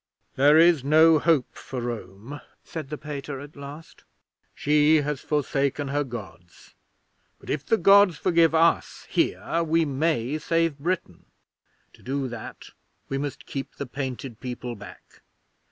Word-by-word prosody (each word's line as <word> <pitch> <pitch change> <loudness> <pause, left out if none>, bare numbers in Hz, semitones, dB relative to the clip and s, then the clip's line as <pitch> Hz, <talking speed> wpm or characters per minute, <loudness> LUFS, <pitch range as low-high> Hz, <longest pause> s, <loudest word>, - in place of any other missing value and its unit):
'"There 145 +3 +5
is 165 -4 +5
no 155 +2 +6
hope 155 -5 +2
for 130 - -7
Rome," 120 +2 -6 0.2
said 155 -5 -7
the 150 - -5
Pater, 145 -2 -6
at 145 +2 -11
last. 140 +3 -11 0.5
"She 150 +1 +4
has 150 -2 -3
forsaken 140 -1 -1
her 145 +1 0
Gods, 105 -9 -11 0.6
but - - -8
if 145 -1 -2
the 225 - +2
Gods 195 -2 +6
forgive 165 -3 +3
us 165 +1 +2
here, 170 - 0
we 165 0 +2
may 145 -1 -1
save 165 -1 0
Britain. 165 - -3 0.7
To - - -20
do 135 +1 -2
that, 115 -2 -9 0.4
we 135 - -2
must 145 -1 -5
keep 135 -1 -6
the 140 - -5
Painted 130 -2 -6
People 125 -1 -6
back. 100 -1 -14
145 Hz, 140 wpm, -25 LUFS, 130-160 Hz, 0.7 s, no